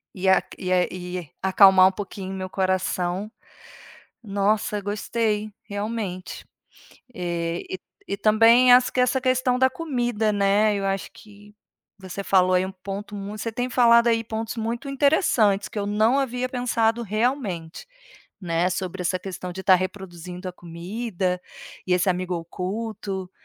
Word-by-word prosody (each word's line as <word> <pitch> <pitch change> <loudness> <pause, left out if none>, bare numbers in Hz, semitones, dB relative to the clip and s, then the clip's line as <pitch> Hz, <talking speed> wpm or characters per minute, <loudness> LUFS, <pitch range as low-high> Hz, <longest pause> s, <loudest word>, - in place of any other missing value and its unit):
E 190 0 -2
a 190 - +5 0.2
e 185 -1 -4
é 180 -1 +3
e 180 -3 -6
acalmar 190 -1 +7
um - - -6
pouquinho 190 -1 -7
o - - -5
meu 185 0 -5
coração. 185 +1 -1 0.9
Nossa 205 +1 0
gostei, 210 +1 -1
realmente, 205 -3 -5 0.7
e, 170 -2 -3
e 185 - -4 0.3
e - - 0
também 230 +4 +6
acho 250 0 +5
que 255 - +1
essa 250 +1 +2
questão 255 -1 +1
da 260 - +5
comida, 245 -8 -1
né, 205 +1 +3
eu 195 - -3
acho 195 0 -2
que 205 0 -16 0.4
você 190 +1 -6
falou 185 -1 +3
aí 180 0 +3
um 190 - -5
ponto 195 +2 -7
muito 205 +1 -6
você 230 - -2
tem 245 +3 -2
falado 235 -1 +5
aí 230 0 +2
pontos 220 +1 -4
muito 235 +4 -3
interessantes 260 - +2
que - - -15
eu 200 - -2
não 215 +5 +2
havia 255 -1 -2
pensado 235 -2 0
realmente, 215 - -2 0.6
né, 170 0 0
sobre 185 0 -4
essa 180 +1 0
questão 180 -1 -6
de 190 - -6
estar 190 0 +6
reproduzindo 180 -1 -6
a - - -10
comida 180 +2 -4 0.5
e 180 - +2
esse 180 +1 +2
amigo 180 0 -1
oculto, 190 +2 -5
200 Hz, 155 wpm, -24 LUFS, 185-225 Hz, 0.9 s, acalmar